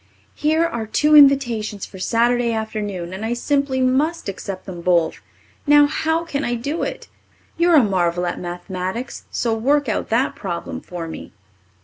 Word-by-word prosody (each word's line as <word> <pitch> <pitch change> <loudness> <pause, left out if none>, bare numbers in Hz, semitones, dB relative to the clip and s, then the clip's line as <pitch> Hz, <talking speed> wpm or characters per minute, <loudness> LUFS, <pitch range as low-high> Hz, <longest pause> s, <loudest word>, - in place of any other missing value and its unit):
Here 315 +2 +1
are 235 -8 -3
two 300 +7 +3
invitations 240 -8 +4
for 190 - -12
Saturday 235 +3 +1
afternoon 205 -5 -4
and 190 +3 -6
I 225 +2 -1
simply 275 +1 0
must 285 +6 +1
accept 195 -1 -6
them 180 -3 -7
both. 170 -2 +1 0.5
Now, 290 0 +7
how 320 +3 -1
can 285 -3 -3
I 240 - -1
do 280 +8 -3
it? - - -4 0.5
You're 340 0 +4
a 285 - +7
marvel 180 -3 0
at 175 - -3
mathematics 185 +6 -5
so 230 -2 -1
work 280 +5 +1
out 215 - -2
that 240 +4 +1
problem 175 -4 -5
for 175 -2 -7
me. 160 - -9
230 Hz, 160 wpm, -21 LUFS, 190-280 Hz, 0.5 s, Now